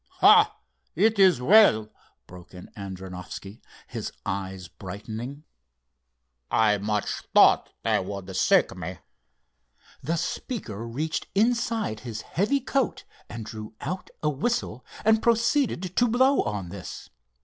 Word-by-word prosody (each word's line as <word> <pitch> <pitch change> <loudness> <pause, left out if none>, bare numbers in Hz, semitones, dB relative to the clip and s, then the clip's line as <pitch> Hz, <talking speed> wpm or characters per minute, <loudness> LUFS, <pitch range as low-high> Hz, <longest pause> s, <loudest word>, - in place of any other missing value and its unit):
"Ah, - - +7 0.4
it 215 +4 +3
is 185 -9 +6
well," 125 - +5 0.3
broke 90 0 -14
in 90 - -11
Adrianoffski, 95 +1 -8 0.2
his - - -5
eyes 95 -1 -4
brightening. 110 - -7 1.1
"I 105 -2 +3
much 105 0 -1 0.3
thought - - +6
they - - +2
would 95 0 -6
seek 95 - +3
me." 90 0 -6 1.0
The 165 +6 -1
speaker 160 - -4
reached 150 +7 -3
inside 225 - +1
his 110 -2 -6
heavy 240 - 0
coat 270 -1 -1 0.3
and 115 -2 -7
drew 110 0 -8
out 185 0 -5
a 150 - +3
whistle, 195 - -2 0.2
and 220 0 +4
proceeded 230 - +1
to 245 - +5
blow 260 +4 +3
on 100 -4 -4
this. 90 0 -9
115 Hz, 120 wpm, -26 LUFS, -, 1.1 s, Ah